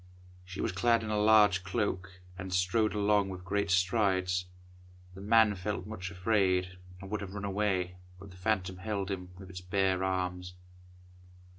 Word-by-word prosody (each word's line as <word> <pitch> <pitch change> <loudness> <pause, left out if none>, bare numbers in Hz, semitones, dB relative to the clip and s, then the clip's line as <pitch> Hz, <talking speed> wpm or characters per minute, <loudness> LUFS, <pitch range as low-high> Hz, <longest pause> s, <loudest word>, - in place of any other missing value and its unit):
She 90 +1 -7
was - - 0
clad 115 +5 +2
in 110 - -4
a 105 - +1
large 105 -3 +5
cloak, 95 -3 -3
and 95 0 -7
strode 95 +5 +1
along 105 -1 +2
with 90 -1 -8
great 100 +1 -1
strides. 90 -1 +1 0.7
The 95 - -10
man 110 +1 +5
felt 95 0 -4
much 95 -4 -6
afraid, 90 -2 +1 0.2
and 95 +1 -10
would 105 - -2
have 100 0 -7
run 100 0 -4
away, 95 -3 -1 0.2
but 100 0 -11
the - - -14
phantom 95 -1 -1
held 100 0 -3
him 90 -2 -5
with 95 -1 -11
its 90 0 -7
bare 95 0 +1
arms. 90 -1 -2
95 Hz, 165 wpm, -31 LUFS, 90-105 Hz, 0.7 s, large